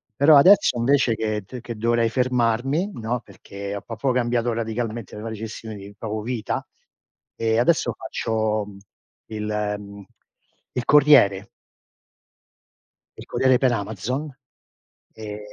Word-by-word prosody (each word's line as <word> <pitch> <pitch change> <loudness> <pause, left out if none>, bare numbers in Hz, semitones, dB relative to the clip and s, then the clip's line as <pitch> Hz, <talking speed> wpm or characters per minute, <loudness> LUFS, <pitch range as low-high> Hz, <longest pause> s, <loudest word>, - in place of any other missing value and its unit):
però 145 +3 +6
adesso 180 -5 +6
invece 125 -1 +2
che 110 -2 -2
t 125 +4 -9
che 120 0 -7
dovrei 115 0 +1
fermarmi, 125 - 0
no, 115 +1 -3
perché 100 0 -8
ho 100 - -5
proprio 120 +4 -2
cambiato 120 -1 0
radicalmente 115 -1 -4
la 105 - -8
mia 115 - -5
gestione 110 0 -7
di 100 0 -10
proprio 110 -1 -4
vita, 120 -1 -3 0.7
e 115 0 +1
adesso 155 +7 +2
faccio 110 -2 -1 0.6
il, 105 -1 -5 0.3
mhmm, 100 0 -11 0.7
il 125 -1 -3
corriere. 135 -10 +5 1.7
Il - - -10
corriere 130 -1 +2
per 130 -1 +2
Amazon. 115 +7 -3 0.8
Ehm, 105 -1 -7
115 Hz, 125 wpm, -23 LUFS, 110-125 Hz, 1.7 s, però